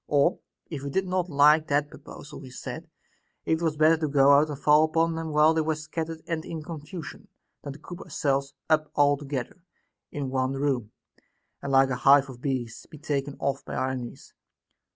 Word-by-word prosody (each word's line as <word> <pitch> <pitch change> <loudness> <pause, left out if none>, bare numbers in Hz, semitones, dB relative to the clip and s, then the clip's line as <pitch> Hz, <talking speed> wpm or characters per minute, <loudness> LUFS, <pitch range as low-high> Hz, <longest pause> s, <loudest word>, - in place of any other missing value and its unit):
Or, 145 +4 +2 0.3
if 150 -5 -6
we 140 - -5
did 190 +7 0
not 185 -1 -1
like 150 +1 +5
that 145 +1 +1
pro - - -12
posal, 145 - -11
he 130 - -10
said, 125 - -8 0.6
it 160 +1 0
was 160 -3 0
better 155 +2 +5
to 155 -1 -1
go 140 -1 +5
out 145 +2 +5
and 145 - -5
fall 150 +2 +5
upon 165 +1 +1
them 160 0 -4
while 150 +1 +5
they 160 - +1
were 155 0 0
scattered 160 +1 -5
and 165 -2 -3
in 160 -2 -6
confusion, 160 +1 -8 0.3
than 140 - -7
to - - -12
coop 175 +4 -10
ourselves 140 -1 -2
up 155 -1 +2
altogether 145 +2 0 0.5
in 140 -3 -4
one 130 0 0
room, 135 -6 -1 0.7
and 140 - -4
like 135 0 +4
a 125 - -1
hive 140 +1 +5
of 120 -1 -13
bees 130 -5 -4
be 155 - -11
taken 145 -2 -3
off 140 0 -2
by - - -7
our 130 - -1
enemies. 125 -2 -8
145 Hz, 195 wpm, -26 LUFS, 135-160 Hz, 0.7 s, like